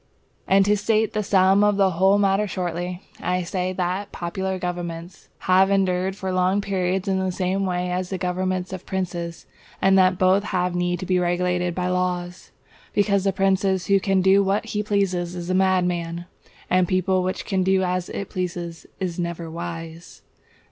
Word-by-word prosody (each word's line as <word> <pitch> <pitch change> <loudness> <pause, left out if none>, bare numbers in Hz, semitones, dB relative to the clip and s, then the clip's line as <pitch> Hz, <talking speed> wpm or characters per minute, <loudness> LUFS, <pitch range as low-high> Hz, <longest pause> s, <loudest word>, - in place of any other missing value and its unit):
And 195 0 +4
to 205 +1 +3
state 215 +1 +1
the 215 - 0
sum 195 0 +4
of 210 -1 +3
the 195 -1 +3
whole 190 +4 +3
matter 200 +1 +2
shortly, 180 0 -4 0.2
I 180 0 0
say 180 +1 -2
that 185 +2 -2
popular 190 +2 -3
governments 175 -1 -6
have 190 +1 +4
endured 190 -1 +1
for 190 -1 -4
long 185 +2 +2
periods 190 -1 -1
in 190 -1 +1
the 190 0 -1
same 190 +1 -1
way 180 0 -1
as 180 0 -2
the 190 - -3
governments 185 +1 -2
of 185 - -8
princes, 175 -3 -4 0.3
and 195 0 +4
that 185 -1 +4
both 190 +2 +3
have 180 -3 -1
need 175 0 -1
to - - -4
be 185 0 +2
regulated 180 0 0
by 180 - -1
the 180 - 0
laws; 180 0 -2 0.4
because 200 -1 +2
the 195 - +3
prince 195 0 +1 0.2
who 200 0 +4
can 190 -1 +1
do 195 +1 +5
what 195 +3 0
he 210 - -1
pleases 185 -4 -1
is 175 0 -4
a - - +1
madman, 180 -2 +1 0.4
and 185 0 +2
the - - -13
people 185 0 +1
which 185 +1 -3
can 190 -2 0
do 190 0 +2
as 180 -1 -1
it 200 - -5
pleases 175 -2 -4
is 180 -2 -3
never 170 -1 -4
wise. 165 0 -8
185 Hz, 185 wpm, -23 LUFS, 180-195 Hz, 0.4 s, do